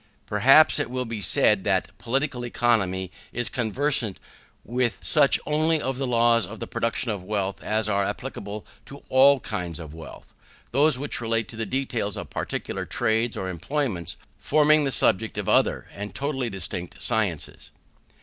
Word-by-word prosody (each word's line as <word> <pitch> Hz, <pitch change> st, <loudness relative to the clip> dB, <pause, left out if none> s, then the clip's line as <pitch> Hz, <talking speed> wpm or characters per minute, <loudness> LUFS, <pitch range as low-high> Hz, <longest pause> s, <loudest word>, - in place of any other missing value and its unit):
Perhaps 135 Hz, +9 st, +5 dB
it -, -, -2 dB
will 125 Hz, 0 st, -2 dB
be 115 Hz, -2 st, -5 dB
said, 90 Hz, -, +4 dB
that -, -, 0 dB
Political 130 Hz, 0 st, -1 dB
Economy 100 Hz, -7 st, 0 dB, 0.2 s
is 120 Hz, 0 st, -2 dB
conversant 120 Hz, -2 st, -1 dB, 0.5 s
with 120 Hz, 0 st, 0 dB
such 145 Hz, -3 st, +4 dB
only 155 Hz, +1 st, +2 dB
of 135 Hz, -2 st, -3 dB
the 135 Hz, -, -1 dB
laws 115 Hz, -1 st, +3 dB
of 110 Hz, +1 st, -9 dB
the -, -, -4 dB
production 115 Hz, 0 st, -2 dB
of 100 Hz, -3 st, -4 dB
wealth 100 Hz, -1 st, -2 dB
as 110 Hz, 0 st, 0 dB
are 100 Hz, -1 st, +1 dB
applicable 100 Hz, +1 st, -5 dB, 0.2 s
to 140 Hz, +1 st, -11 dB
all 135 Hz, +1 st, +6 dB
kinds 90 Hz, -5 st, -4 dB
of 80 Hz, -3 st, -9 dB
wealth: 80 Hz, -2 st, -12 dB, 0.4 s
those 145 Hz, +2 st, +4 dB
which 140 Hz, -2 st, -3 dB
relate 115 Hz, -1 st, 0 dB
to -, -, -9 dB
the 110 Hz, -1 st, -3 dB
details 120 Hz, -5 st, -1 dB
of -, -, -7 dB
particular -, -, -4 dB
trades 115 Hz, 0 st, 0 dB
or 95 Hz, -, -3 dB
employments 95 Hz, -, -3 dB, 0.2 s
forming 155 Hz, 0 st, +4 dB
the 135 Hz, -, 0 dB
subject 110 Hz, -1 st, +1 dB
of -, -, -3 dB
other -, -, +2 dB
and 100 Hz, +1 st, -7 dB
totally 135 Hz, -3 st, -2 dB
distinct 95 Hz, -2 st, -6 dB
sciences. 105 Hz, -9 st, -2 dB
115 Hz, 160 wpm, -25 LUFS, 100-135 Hz, 0.5 s, all